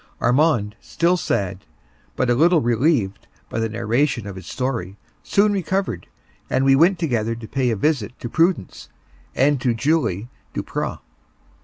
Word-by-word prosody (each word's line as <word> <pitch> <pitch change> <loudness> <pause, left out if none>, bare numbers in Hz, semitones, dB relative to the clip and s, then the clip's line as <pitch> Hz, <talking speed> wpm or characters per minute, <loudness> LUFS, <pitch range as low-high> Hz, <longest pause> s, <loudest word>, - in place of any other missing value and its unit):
Armand, 120 -4 +2
still 170 +2 +1
sad, 95 - -2 0.5
but 130 - 0
a 120 - +3
little 165 +6 +4
relieved 120 - +1 0.2
by 115 - -3
the 115 0 0
narration 120 +2 0
of 100 -2 -7
his 95 -2 -10
story, 115 -8 -3 0.2
soon 205 +1 +2
recovered, 190 - -2 0.4
and 130 +1 +1
we 135 0 +6
went 175 +6 +4
together 115 -9 -1
to 115 -1 -9
pay 130 0 0
a 115 - +1
visit 125 -1 -1
to - - -5
Prudence 165 - 0 0.5
and 140 0 +2
to 120 -3 +1
Julie 120 - 0 0.3
Duprat. - - -3
125 Hz, 150 wpm, -21 LUFS, 110-155 Hz, 0.5 s, we